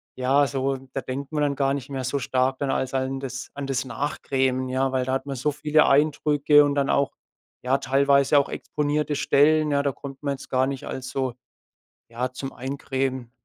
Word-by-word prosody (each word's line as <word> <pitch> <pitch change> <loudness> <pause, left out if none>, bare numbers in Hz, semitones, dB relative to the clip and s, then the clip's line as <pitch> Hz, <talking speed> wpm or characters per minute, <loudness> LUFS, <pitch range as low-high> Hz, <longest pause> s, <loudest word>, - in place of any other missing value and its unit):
ja, 135 +3 +3
so, 135 0 -1 0.2
da 135 - -2
denkt 135 +3 -5
man 150 -1 -1
dann 140 -1 +1
gar 135 0 +1
nicht 140 -1 -5
mehr 135 -2 -4
so 140 +3 -1
stark 130 +1 0
dann 140 -2 -1
als 130 0 -1
an 135 0 -1
das 130 -1 -6
an 140 -1 -4
das 135 0 -1
Nachcremen, 130 -2 -1
ja? 130 +1 0
Weil 130 -1 0
da 130 - -1
hat 135 0 -1
man 135 - -3
so 150 +4 0
viele 150 +1 +3
Eindrücke 150 0 +4
und 145 - 0
dann 140 -1 +1
auch, 140 - +2 0.5
ja, 130 +2 +2
teilweise 140 +1 +3
auch 140 - -1
exponierte 150 0 -1
Stellen, 150 +2 +3
ja? 140 0 +2
Da 140 - +1
kommt 135 +1 -10
man 140 -1 -1
jetzt 135 - -12
gar 130 0 +2
nicht 135 -1 -5
also, 130 -1 -3 0.8
ja, 125 +2 -3
zum 135 +1 -6
Eincremen. 130 -1 -3
135 Hz, 200 wpm, -24 LUFS, 130-140 Hz, 0.8 s, Eindrücke